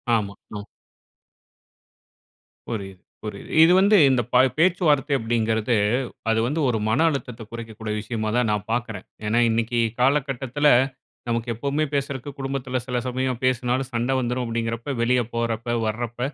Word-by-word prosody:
ஆமா. 100 -3 -1 0.2
ம். 100 - -5 2.1
புரியுது, 95 -5 -6 0.2
புரியுது. 105 - -7
இது 165 - +6
வந்து 205 +2 +5
இந்த 130 -2 +3
ப - - +1 0.2
பேச்சுவார்த்தை 160 -5 +3
அப்படிங்கறது, 115 0 0 0.5
அது 110 0 +2
வந்து 150 +4 -1
ஒரு 115 - +1
மன 110 - +2
அழுத்தத்தை 125 -5 -5
குறைக்கக்கூடிய 110 -2 -6
விஷயமா 110 0 -3
தான் 120 -3 +2
நான் 105 -1 -1
பார்க்குறேன். 115 -5 -3 0.2
ஏன்னா 110 +3 +2
இன்னைக்கு 115 +1 0 0.2
காலகட்டத்துல 135 +1 +1 0.6
நமக்கு 115 0 -1
எப்பவுமே 140 +6 -1
பேசறக்கு, 140 -1 -2
குடும்பத்துல 135 -1 -2
சில 125 0 -1
சமயம் 130 -1 -2
பேசுனாலும் 130 +1 0
சண்டை 120 +3 0
வந்துரும். 125 0 -1
அப்படீங்கறப்ப 115 +3 -3
வெளிய 125 +1 +3
போறப்ப, 115 0 -2 0.2
வரப்ப 120 +2 -4
120 Hz, 130 wpm, -23 LUFS, 115-135 Hz, 2.1 s, இது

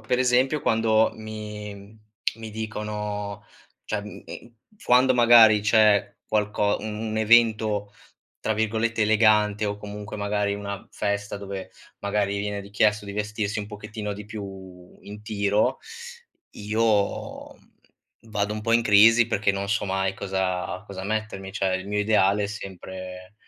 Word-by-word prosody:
per 115 +3 -1
esempio, 130 +4 +2
quando 110 -1 +2
mi 105 -1 -8 0.4
mi 110 -1 -7
dicono 105 -1 -5 0.4
cioè, 105 - -2
mh, 105 - -10
ehm, 115 - -10 0.3
quando, 130 +1 +5
magari, 115 -3 +7
c'è 105 -1 +3
qualco 105 -1 +1
un 110 0 -5 0.2
un 110 - -3
evento, 110 -2 +3 0.5
tra 110 - 0
virgolette, 110 +1 0
elegante 105 -1 +3
o, 100 0 -2
comunque, 105 0 -8
magari, 100 0 -1
una 100 -1 -6
festa 100 0 -2
dove, 100 -1 -7 0.3
magari, 100 0 -1
viene 105 0 -3
richiesto 105 +1 +1
di 100 - -7
vestirsi 105 0 -2
un 100 - -7
pochettino 105 0 -6
di 105 +1 -8
più 95 -4 -10
in 105 +1 -10
tiro, 105 -1 0 0.8
io, 105 -1 -1
mhmm, - - -26 0.6
vado 105 0 -1
un 110 - -4
po' 115 +2 -1
in 115 0 +4
crisi, 115 +2 +6
perché 105 -3 +1
non 100 0 -3
so 105 +1 0
mai 95 0 -1
cosa 95 -2 -2
cosa 95 -2 -8
mettermi, 105 -2 -4
cioè, 95 -2 0
il 95 +1 -7
mio 105 0 -1
ideale 105 -1 +3
è - - -1
sempre 95 -2 -8
105 Hz, 145 wpm, -25 LUFS, 100-110 Hz, 0.8 s, magari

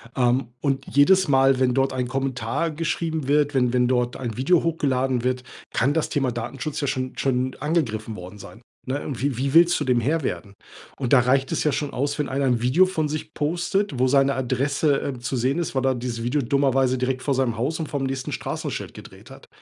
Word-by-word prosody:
Ähm, 125 -1 +1
und 135 -2 -1
jedes 185 +7 +4
Mal, 135 -1 +4
wenn 125 -1 +2
dort 135 0 +1
ein 125 -1 -2
Kommentar 135 +4 -2
geschrieben 160 -2 -2
wird, 145 0 +2
wenn 125 -2 +2
wenn 125 -1 +3
dort 125 -1 0
ein 120 -4 -5
Video 165 +7 +3
hochgeladen 130 -6 0
wird, 125 0 -1 0.3
kann 135 +5 +2
das 160 - 0
Thema 135 -3 0
Datenschutz 135 +6 -4
ja 140 - -1
schon 130 0 -2
schon 130 -1 0
angegriffen 115 -8 -1
worden 90 +3 -10
sein, 100 +4 -12 0.3
ne? 135 +2 -3
Und 130 -4 -5
wie 135 -4 -1
wie 135 +1 -1
willst 170 +1 +5
du 145 - -2
dem 125 -2 +2
Herr 155 +5 0
werden? 100 -5 -4 0.4
Und 130 -1 -1
da 130 - +8
reicht 135 +2 +1
es - - 0
ja 150 - +2
schon 145 0 -2
aus, 145 +3 -2
wenn 145 - -1
einer 135 +1 0
'n 120 -3 +1
Video 140 +10 +4
von 160 -5 -1
sich 155 0 -5
postet, 175 +2 -1
wo 130 +1 +3
seine 135 +1 +3
Adresse, 135 +3 0
äh, 130 -3 -4
zu 120 +2 -3
sehen 130 +5 0
ist, 170 - -3
weil 130 0 +1
er 130 -1 +2
dieses 120 -1 -4
Video 140 +4 0
dummerweise 135 0 +2
direkt 130 0 -1
vor 140 - +1
seinem 125 -4 0
Haus 150 +8 -1
und 155 - -3
vorm 140 -2 -2
nächsten 135 -1 -3
Straßenschild - - -4
gedreht - - -13
hat. - - -14
135 Hz, 220 wpm, -23 LUFS, 125-145 Hz, 0.4 s, da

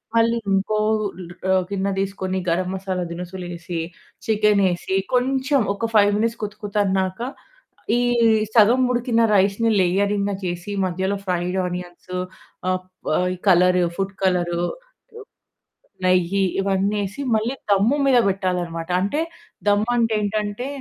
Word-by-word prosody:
మళ్ళి 230 +1 +3 0.2
ఇంకో 200 +2 +1 0.8
ఆహ్, 185 -1 +3
గిన్న 195 0 -1
తీసుకొని, 190 -1 -2
గరం 180 +2 0
మసాలా 190 -1 -3
దినుసులు 180 +1 -6
ఏసి, 170 -1 -5 0.5
చికెను 210 -2 +3
ఏసి 190 +2 -3 0.2
కొంచెం 265 +2 +2
ఒక 225 +2 -3
5 205 -1 +6
మినిట్స్ 230 +1 -1
కుతకుతన్నాక, 200 -2 -1 0.8
ఈ - - +1 0.5
సగం 230 +3 +6
ఉడికిన 240 -1 +1 0.2
రైస్‌ని 200 +4 +2
లేయరింగ్‌గ 200 +2 +1
చేసి 175 +3 -4
మధ్యలో 190 +2 -1
ఫ్రైడ్ 180 0 -1
ఆనియన్స్ 180 0 -7 0.6
ఆహ్, 185 0 +1 0.3
ప్ - - -2
ఆహ్, 180 0 0 0.2
కలర్ 180 0 +5 0.2
ఫుడ్ 195 0 -2
కలరు, 175 -2 +1 1.4
నెయ్యి 185 +1 +2 0.2
ఇవన్నీ 195 +1 0
ఏసి 195 +9 -7
మళ్ళి 225 +5 0 0.2
దమ్ము 210 +8 +3
మీద 260 - +5
పెట్టాలి 185 -2 -1
అనమాట. 165 0 -6
అంటే 290 +11 0 0.5
దమ్ము 205 +3 +2
అంటే 230 -2 +2
ఏంటంటే 210 +3 -2
195 Hz, 125 wpm, -22 LUFS, 180-215 Hz, 1.4 s, 5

